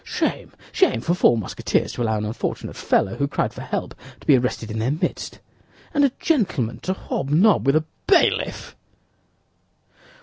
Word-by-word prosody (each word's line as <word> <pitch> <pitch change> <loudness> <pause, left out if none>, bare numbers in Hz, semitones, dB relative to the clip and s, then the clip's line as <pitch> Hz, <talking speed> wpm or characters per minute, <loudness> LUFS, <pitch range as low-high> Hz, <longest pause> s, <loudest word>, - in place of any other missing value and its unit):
"Shame, - - -2 0.2
shame, 375 - +2
for 175 - 0
four 120 -9 +4
Musketeers 110 - -1
to - - -5
allow 110 -2 +1
an 105 - -2
unfortunate 110 +2 -4
fellow 95 - +1
who 140 - 0
cried - - -1
for - - -8
help - - -4 0.3
to - - -18
be 145 - +6
arrested 120 -3 -1
in 110 - -3
their 115 +3 0
midst! 150 +4 -3 0.6
And 285 - +3
a 280 - +5
gentleman 185 - 0
to 185 - -2
hobnob 175 +1 +1
with 140 - +4
a 155 0 +2 0.2
bailiff!" 365 -4 +2
140 Hz, 165 wpm, -22 LUFS, 115-190 Hz, 0.6 s, be